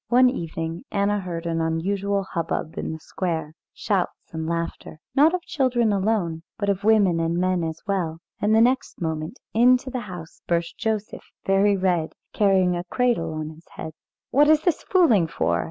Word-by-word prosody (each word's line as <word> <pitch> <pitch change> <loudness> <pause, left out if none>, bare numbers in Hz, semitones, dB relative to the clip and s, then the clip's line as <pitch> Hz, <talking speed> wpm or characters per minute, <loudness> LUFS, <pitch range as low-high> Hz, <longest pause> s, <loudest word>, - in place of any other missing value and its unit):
One 250 +1 +5
evening 165 -5 -4
Anna 205 +1 +1
heard 175 -3 -5
an 165 -1 -1
unusual 195 +5 0
hubbub 165 -3 -3
in - - -3
the 160 - -6
square, 160 -3 -3 0.2
shouts 190 -5 -2
and 160 0 -3
laughter, 165 -2 -4
not 300 +6 +5
of 360 - -4
children 245 -9 +1
alone, 190 -5 0 0.2
but 200 -1 -1
of 200 0 0
women 205 -6 +4
and 165 +1 0
men 185 -1 +1
as 160 0 -4
well, 180 -5 -1 0.2
and 210 - +2
next 240 +4 +2
moment 160 - -3 0.2
into 250 +3 +4
the 255 - -2
house 170 -3 -9
burst 170 -1 0
Joseph 220 -2 -3 0.2
very 195 +1 +3
red, 180 -4 0 0.2
carrying 190 -3 +3
a 175 - -3
cradle 225 -6 0
on 155 0 -4
his 160 +2 -16
head. 160 - -6 0.4
"What 290 +3 +5
is 310 -1 +5
this 350 -3 +1
fooling 260 - +4
for?" 160 - 0
190 Hz, 170 wpm, -24 LUFS, 165-220 Hz, 0.4 s, One